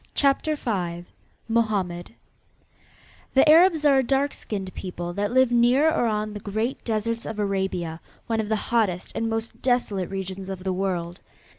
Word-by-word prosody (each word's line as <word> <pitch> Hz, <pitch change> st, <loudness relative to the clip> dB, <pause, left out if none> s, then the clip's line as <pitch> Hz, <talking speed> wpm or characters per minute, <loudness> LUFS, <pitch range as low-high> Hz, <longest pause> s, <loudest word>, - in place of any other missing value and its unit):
CHAPTER 285 Hz, +2 st, +2 dB
V 175 Hz, -10 st, -3 dB, 0.4 s
MOHAMMED 210 Hz, -5 st, -1 dB, 1.2 s
The 270 Hz, -, +6 dB
Arabs 325 Hz, 0 st, +6 dB
are 275 Hz, -2 st, +6 dB
a -, -, +2 dB
dark 275 Hz, +3 st, +1 dB
skinned 195 Hz, -3 st, -5 dB
people 175 Hz, -2 st, -5 dB
that 205 Hz, +3 st, -1 dB
live 260 Hz, 0 st, +4 dB
near 245 Hz, +6 st, +4 dB
or 280 Hz, -7 st, +1 dB
on 215 Hz, -1 st, -1 dB
the 210 Hz, -, -6 dB
great 220 Hz, +5 st, -3 dB
deserts 230 Hz, +1 st, -1 dB
of 220 Hz, -, -6 dB
Arabia, 190 Hz, -5 st, -2 dB, 0.2 s
one 225 Hz, -2 st, -1 dB
of 215 Hz, -1 st, -2 dB
the 220 Hz, -, +2 dB
hottest 210 Hz, -5 st, 0 dB
and 225 Hz, -, -1 dB
most 225 Hz, 0 st, -3 dB
desolate 240 Hz, -8 st, 0 dB
regions 190 Hz, 0 st, -5 dB
of 190 Hz, -1 st, -6 dB
the 190 Hz, -1 st, -1 dB
world. 180 Hz, -2 st, -2 dB
215 Hz, 160 wpm, -25 LUFS, 190-245 Hz, 1.2 s, The